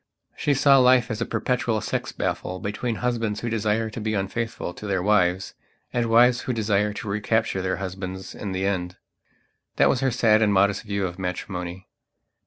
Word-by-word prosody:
She 145 - +1
saw 135 0 +6
life 125 -2 +4
as 110 0 -4
a - - -1
perpetual 125 -3 0
sex - - -3
battle 90 - -3
between 110 +4 -3
husbands 115 -4 -1
who 120 - -3
desire 110 0 0
to 110 - -6
be 110 0 -1
unfaithful 105 0 -3
to 105 - -8
their 95 -2 0
wives, 95 -2 +2 0.4
and 120 -1 +1
wives 120 +2 +5
who 130 - -2
desire 105 -2 +1
to 105 - -7
recapture 105 0 0
their 95 0 -1
husbands 95 0 -6
in 100 - -5
the 95 +1 -1
end. 90 -2 -2 0.8
That - - +4
was 125 - +2
her 135 0 +2
sad 115 -3 +3
and 105 -2 +3
modest 100 +1 +3
view 100 -2 -2
of 90 0 -6
matrimony. 90 0 -5
105 Hz, 185 wpm, -24 LUFS, 95-115 Hz, 0.8 s, saw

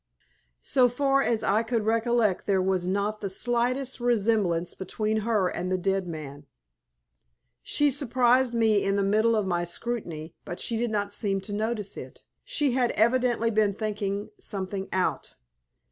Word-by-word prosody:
So 255 -2 +4
far 275 +2 +2
as 225 -4 0
I 210 +1 +3
could 230 -2 -1
recollect 225 -3 +1
there 195 -2 +3
was 185 -1 0
not 200 +3 -1
the 200 - -2
slightest 245 +6 -1
resemblance 210 -8 +1
between 215 +3 -2
her 215 -3 +1
and 180 +1 -3
the 185 - +2
dead 190 0 -1
man. 145 -3 -8 1.1
She 295 -1 +2
surprised 255 -2 +2
me 220 -3 +3
in 195 0 +1
the 200 - +1
middle 215 +3 +3
of 210 -2 +1
my 175 -2 0
scrutiny, 175 -4 -4
but 175 - -7
she 230 - -2
did 235 +1 0
not 205 -1 -2
seem 200 -2 0
to 205 +2 -7
notice 215 -1 -2
it. - - -10 0.2
She 305 - 0
had 245 -1 +2
evidently 235 0 +2
been 210 -2 +2
thinking 205 -2 -3
something 195 - -4
out. 185 -1 -1
215 Hz, 160 wpm, -27 LUFS, 195-240 Hz, 1.1 s, So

